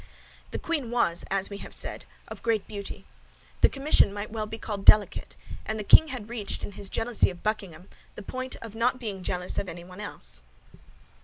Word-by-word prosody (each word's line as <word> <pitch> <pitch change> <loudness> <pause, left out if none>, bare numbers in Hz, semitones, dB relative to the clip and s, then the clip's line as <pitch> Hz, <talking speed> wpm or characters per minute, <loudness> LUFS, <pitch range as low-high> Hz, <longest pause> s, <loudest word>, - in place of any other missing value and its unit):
The - - -4
queen 300 -8 -2
was, 230 -8 +1
as 195 +1 0
we 200 - -6
have - - -3
said, - - -2 0.2
of - - -9
great 225 -3 +1
beauty. 200 -1 -7 0.6
The - - +7
commission 275 -6 +4
might 205 +1 -5
well 215 -1 -3
be 225 - -6
called 210 -3 -5
delicate; 210 0 +5 0.3
and 215 - -3
the - - -2
king 315 +9 +8
had 255 -7 -6
reached, 225 -3 -4
in - - -4
his 195 0 -4
jealousy 230 -1 +2
of 175 -2 -10
Buckingham, 190 -5 -3 0.3
the 210 - -8
point 255 +5 -4
of 225 -2 -8
not 245 +3 +1
being 205 -6 -4
jealous 180 0 -2
of 195 - -3
anyone 175 +3 -9
else. 60 - -4
210 Hz, 190 wpm, -28 LUFS, 195-230 Hz, 0.6 s, king